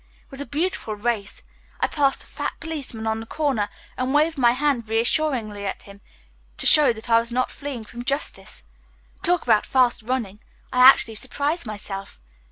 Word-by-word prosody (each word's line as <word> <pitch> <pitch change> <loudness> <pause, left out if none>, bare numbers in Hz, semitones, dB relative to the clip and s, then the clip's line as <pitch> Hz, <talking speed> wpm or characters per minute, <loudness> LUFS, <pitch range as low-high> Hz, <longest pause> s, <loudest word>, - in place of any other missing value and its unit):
It - - -33
was 270 +1 -5
a 285 - -6
beautiful 295 - -2
race. 210 -2 -3 0.4
I - - +3
passed 280 -3 +1
a - - -18
fat - - -4
policeman 285 -9 -4
on 220 0 0
the 225 - -8
corner, 265 -10 0 0.3
and 255 +2 -1
waved 315 +2 +3
my 240 -4 +4
hand 255 -4 0
reassuringly 225 -2 0
at 195 - -4
him 200 0 -14
merely - - -32
to - - -2
show 300 -5 +6
that 220 0 -8
I 230 - +7
was 230 +1 -4
not 255 +1 0
fleeing 280 -5 -6
from 235 +2 -9
Justice. 275 +3 -4 0.6
Talk 355 -1 +2
about 220 -3 +3
fast 255 -3 +3
running! 220 -4 -3 0.3
I 250 - +1
actually 250 -3 +7
surprised 285 +6 -2
myself. 200 - -6
245 Hz, 180 wpm, -23 LUFS, 220-285 Hz, 0.6 s, I